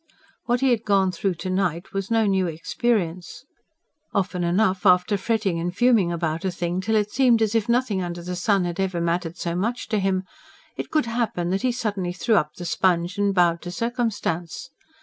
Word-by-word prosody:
What 245 +1 +1
he 265 -1 +3
had 230 -2 +1
gone 195 -3 +2
through 180 +1 -1
to 185 +3 -5
night 180 -2 -1
was 195 -1 -3
no 225 -1 +3
new 190 -2 +2
experience. 175 +1 -2 0.7
Often 185 -2 0
enough 185 +2 +1
after 180 +1 +4
fretting 200 -3 0
and 175 +2 -3
fuming 230 -8 +4
about 165 -1 -2
a 190 - 0
thing 175 +1 -2
till 220 +3 0
it 210 -1 +1
seemed 245 -3 +4
as 220 -1 +1
if 225 -1 0
nothing 235 -5 +1
under 175 -1 -5
the 180 +1 -4
sun 190 +1 +1
had 175 +1 -4
ever 190 -2 -1
mattered 170 0 -1
so 170 -1 -3
much 225 +7 -2
to 215 -1 +1
him, 190 -1 0 0.5
it - - -5
could 310 -4 +1
happen 230 -7 -1
that 195 - 0
he 255 0 +1
suddenly 205 -7 -2
threw 225 +6 0
up 150 -7 +1
the 175 - -7
sponge 175 +2 +1
and 200 -1 +1
bowed 170 -2 +3
to 175 - -6
circumstance. 205 -6 -3
190 Hz, 200 wpm, -24 LUFS, 175-220 Hz, 0.7 s, after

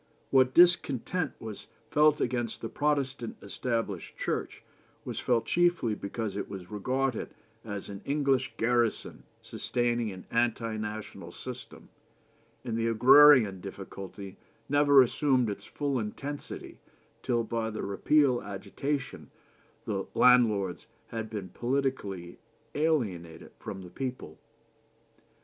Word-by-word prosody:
What 130 -1 +4
discontent 175 -2 +3
was 110 -2 -8 0.2
felt 150 0 +4
against 120 -2 -2
the 115 - -4
Protestant 140 -5 -1
Established 105 -3 -3
Church - - -3 0.4
was - - -4
felt 120 -2 +1
chiefly 175 -10 +2
because 105 0 -4
it 100 - -4
was 95 -2 -8
regarded 130 +4 -2 0.3
as 100 -3 -6
an 100 0 -8
English 140 -3 +1
garrison 120 -1 0 0.2
sustaining 120 -2 -1
an 95 -1 -10
anti 115 -1 0
national 105 0 -6
system; - - -9 0.8
and 115 -3 -2
the 115 0 0
agrarian 125 -3 +7
difficulty 95 +1 -8 0.3
never 145 -1 +6
assumed 125 -3 +1
its 100 - -8
full 140 -3 -2
intensity 140 +7 -6 0.4
till 120 -1 0
by 115 0 -2
the 110 - -5
repeal 130 +5 +2
agitation 130 +8 -4 0.6
the 95 -2 -2
landlords 110 -7 +4 0.2
had 115 -1 -4
been 100 -4 -5
politically 120 -7 -2 0.3
alienated 105 - -1
from 95 -1 -7
the 90 - -11
people." 125 - -6
120 Hz, 115 wpm, -29 LUFS, 105-135 Hz, 0.8 s, agrarian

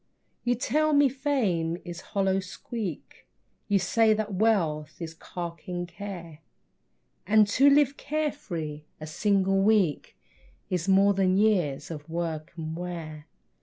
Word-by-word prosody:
You 245 0 +2
tell 305 +6 +1
me 285 -1 +5
fame 225 - 0
is 175 -1 -7
hollow 195 -1 0
squeak, 195 - -7 0.4
You 200 - +3
say 215 +4 +3
that 215 -1 -3
wealth 170 -8 +1
is 165 -2 -6
carking 175 +1 -6
care; 175 -3 -8 0.9
And 215 0 +5
to 275 +6 +5
live 280 -1 +4
care 305 0 -1
free 155 - -6
a 155 - -6
single 195 +3 +1
week 195 -7 +2 0.5
Is 180 -1 -1
more 195 +1 +5
than 190 -1 +2
years 175 -10 +1
of 150 -1 -8
work 165 -2 -3
and 160 0 -4
wear. 165 -3 -6
190 Hz, 130 wpm, -27 LUFS, 165-220 Hz, 0.9 s, me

